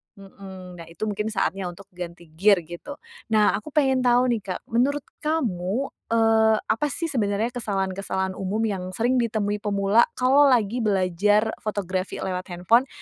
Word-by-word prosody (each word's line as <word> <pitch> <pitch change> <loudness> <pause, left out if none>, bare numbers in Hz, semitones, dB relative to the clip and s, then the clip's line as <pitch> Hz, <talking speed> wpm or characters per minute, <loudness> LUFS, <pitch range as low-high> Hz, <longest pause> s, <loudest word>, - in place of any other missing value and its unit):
Heeh. 195 -1 -11 0.2
Nah, 170 - -8
itu 170 +5 -8
mungkin 210 0 -2
saatnya 195 -3 -1
untuk 185 +3 -11
ganti 175 -2 -9
gear 190 +3 +3
gitu. 175 - -9 0.4
Nah, 210 -1 +5
aku 210 +8 -4
pengen 265 -3 +3
tahu 245 0 +3
nih, 235 - 0
Kak. 185 - -4
Menurut 270 +5 +1 0.2
kamu, 250 - -1 0.2
eee, 225 -1 +4 0.2
apa 295 +7 0
sih 330 +3 -3
sebenarnya 215 -1 0
kesalahan-kesalahan 195 -4 -2
umum 195 +4 -2
yang 200 -5 -2
sering 245 +3 +1
ditemui 215 -3 -1
pemula, 200 +2 +3
kalau 270 +3 +5
lagi 240 -3 +2
belajar 205 +1 +2
fotografi 190 -4 -3
lewat 185 -1 -3
handphone? 205 +9 +2
210 Hz, 150 wpm, -24 LUFS, 190-240 Hz, 0.4 s, Nah